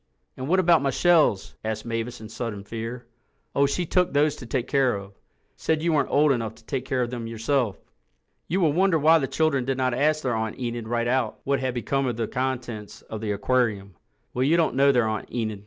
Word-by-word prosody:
"And 130 0 -5
what 185 +4 +3
about 170 -3 +5
my 140 - +1
shells?" 155 - +3
asked 110 0 -3
Mavis 115 +1 -3
in 110 - -9
sudden 110 -2 -5
fear. 115 +3 -6 0.5
"Oh, 140 0 +3
she 175 +5 -1
took 180 +2 +2
those 145 +1 +3
to 125 - -9
take 125 +1 -2
care 135 -4 +2
of. 100 0 -8 0.4
Said 160 -1 -1
you 170 -1 +2
weren't 145 - +2
old 150 0 +4
enough 115 -4 -1
to - - -20
take 130 -2 -3
care 130 -2 0
of 120 - -4
them 120 -2 -4
yourself." 115 0 -1 0.7
You 185 +5 0
will 155 -4 +3
wonder 185 0 +3
why 160 +2 +5
the 135 - -1
children 155 -4 +1
did 130 +1 -1
not 130 -1 +1
ask 155 +4 +1
their 125 - 0
Aunt 110 -1 -2
Enid 120 -2 -4
right 120 0 0
out 125 -3 0
what 140 0 +1
had 130 -1 -2
become 135 +2 0
of 120 -2 -2
the 115 -2 -1
contents 120 -5 -4
of 110 -1 -7
the 110 -2 -2
aquarium. 105 -2 0 0.4
Well, 125 - -2
you 155 +5 +3
don't 165 -2 +2
know 140 +1 +5
their 120 -4 +2
Aunt 110 -1 -4
Enid. 110 -3 -2
125 Hz, 225 wpm, -25 LUFS, 115-145 Hz, 0.7 s, about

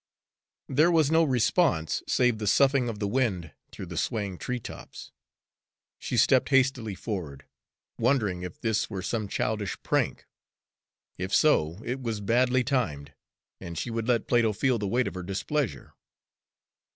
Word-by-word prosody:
There 150 +5 +3
was 160 -4 +3
no 165 +1 +5
response, 130 - +1
save 125 -3 +2
the 105 - -3
soughing 135 +2 +3
of 110 - -5
the 105 -1 -2
wind 100 - -1 0.2
through - - -7
the 85 -2 -4
swaying 100 -6 -2
treetops. 125 -2 -7 0.9
She - - -3
stepped - - +4
hastily 130 -6 +2
forward, 90 - -6 0.5
wondering 110 -7 +1
if 90 -1 -7
this 110 -2 0
were 95 -4 -5
some 110 +1 -2
childish 105 0 -2
prank. - - 0 0.9
If 95 +1 -1
so, 85 - +3
it 130 +2 -3
was 115 -4 -3
badly 125 +5 +2
timed, 75 - -2 0.5
and 85 -1 -8
she 115 - -3
would 115 0 -3
let 120 -3 +2
Plato 115 -3 +3
feel 125 +2 +1
the 105 - -2
weight 120 +5 +1
of - - -4
her 90 - -5
displeasure. 100 +8 -3
115 Hz, 150 wpm, -27 LUFS, 95-130 Hz, 0.9 s, no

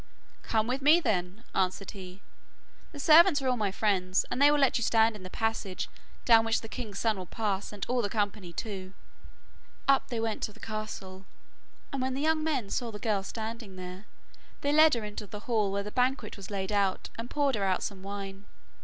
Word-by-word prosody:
'Come 220 -1 +1
with 255 +4 -2
me, 305 +5 +7
then,' 200 - -1
answered 190 +1 0
he; 185 -1 -10 0.7
'the 290 - -9
servants 320 +2 +7
are 270 - -2
all 255 - +3
my 210 -4 0
friends, 190 -3 +1
and 260 - -1
they 285 - +8
will 295 - +4
let 275 -3 +3
you - - -1
stand 225 0 +3
in 210 - -10
the 185 - -8
passage 225 -3 -2 0.4
down 225 -2 +7
which 225 0 +1
the 225 - -8
king's 220 -4 -6
son 220 -2 +1
will 180 - -7
pass, 205 -2 -2
and 205 -2 -5
all 250 0 +1
the 205 - -1
company 205 -4 -2
too.' 190 0 -5 0.9
Up 275 -1 +4
they 235 -3 -3
went 225 -1 -2
to 210 - -3
the - - -18
castle, 195 -3 -6 0.7
and 275 - -1
when 260 0 -1
the 275 - -2
young 315 0 +2
men 270 -10 -1
saw 240 - -1
the 210 - -7
girl 210 -2 0
standing 220 0 -6
there, 185 +2 -8 0.5
they 285 - +1
led 310 -2 +7
her 230 - -3
into 210 0 -6
the 205 +1 -8
hall 215 -4 +1
where 200 +1 -1
the 210 - -7
banquet 250 -2 0
was 195 -2 -9
laid 195 -1 -3
out 200 -2 0
and 230 +1 -5
poured 285 -2 +1
her 205 -4 -1
out 190 -1 +1
some 200 -4 -5
wine. 195 0 -6
215 Hz, 215 wpm, -29 LUFS, 195-250 Hz, 0.9 s, they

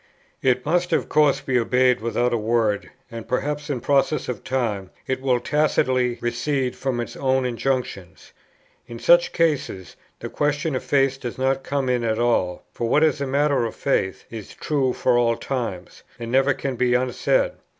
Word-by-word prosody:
It 130 -2 +1
must 175 +3 +1
of - - +1
course 145 -2 +3
be 130 -2 +1
obeyed 125 +1 +2
without 120 +1 0
a - - +2
word, 110 -2 0 0.2
and 115 -1 -8
perhaps 150 +4 -2
in 130 -5 -2
process 145 +2 +1
of 120 -6 -5
time 110 -8 -2 0.2
it 130 0 -2
will 130 -2 +2
tacitly 130 -4 +1
recede 125 +2 -1
from 130 -3 -2
its 120 - -5
own 130 -1 +1
injunctions. 115 - -3 0.6
In 120 -1 -8
such 175 +7 +4
cases 140 - -1 0.2
the - - -5
question 145 +1 -1
of 130 - -3
faith 135 -1 +1
does 120 -3 -6
not 135 +1 0
come 140 -1 -2
in 125 -1 +1
at 110 -1 0
all; 115 -7 0
for 115 - -3
what 150 - +4
is 150 -3 +2
matter 140 0 +1
of 115 - -4
faith 95 -9 -1
is 110 -3 -9
true 140 -4 0
for 125 -1 +2
all 115 -1 +2
times, 115 -10 -5 0.2
and 115 0 -6
never 135 +2 +3
can 135 -3 -4
be 125 0 +2
unsaid. - - +1
130 Hz, 175 wpm, -23 LUFS, 120-140 Hz, 0.6 s, such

